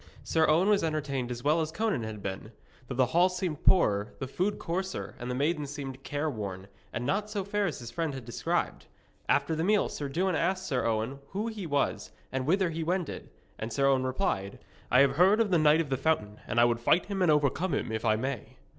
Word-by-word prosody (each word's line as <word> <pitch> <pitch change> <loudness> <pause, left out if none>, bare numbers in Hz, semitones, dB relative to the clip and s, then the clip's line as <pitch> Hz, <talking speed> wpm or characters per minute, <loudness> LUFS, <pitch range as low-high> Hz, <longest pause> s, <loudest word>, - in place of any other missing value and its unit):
Sir 160 -1 +2
Owen 165 +5 +4
was 210 -1 +3
entertained 140 -5 -1
as 120 0 -5
well 155 +3 +3
as 160 0 -2
Conan 210 - 0
had 110 -2 -6
been, 100 +3 -5 0.4
though 130 - -5
the 130 0 +4
hall 175 +9 +3
seemed 180 -4 -3
poorer, 105 - +3
the - - -4
food 185 +9 -1
coarser, 185 +3 -3
and 120 0 -5
the 125 - -1
maidens 150 +1 0
seemed 135 -2 -6
careworn, 110 -12 -4 0.2
and 120 - -3
not 205 +8 0
so 205 -2 -2
fair 200 +1 0
as 155 - -3
his 120 -1 -8
friend 160 +1 -2
had 130 -3 -8
described. 120 - -2 0.4
After 145 +3 +2
the 160 - -1
meal 210 +3 +3
Sir 145 -2 -4
Dewin 185 +6 0
asked 190 +3 0
Sir 130 -7 0
Owen 115 +4 -1
who 205 +7 -3
he 210 -6 -6
was 145 -2 -1 0.2
and 130 0 -2
whither 185 +1 +2
he 165 0 -3
wended, 175 0 -2 0.3
and 110 +1 -4
Sir 135 +3 +1
Owen 135 -1 +3
replied: 130 - -1 0.3
'I 125 - +5
have 140 - +4
heard 190 +5 +5
of 220 -4 +2
the 175 - +4
Knight 155 +1 +5
of 145 -4 -5
the 135 - +1
Fountain, 115 -8 0
and 115 - +1
I 120 - +7
would 120 -1 +1
fight 155 +9 +3
him 200 -2 -3
and 180 - +4
overcome 150 +3 +2
him, - - -2
if 110 0 -3
I 110 -2 +3
may.' 130 0 -4
145 Hz, 225 wpm, -29 LUFS, 125-180 Hz, 0.4 s, I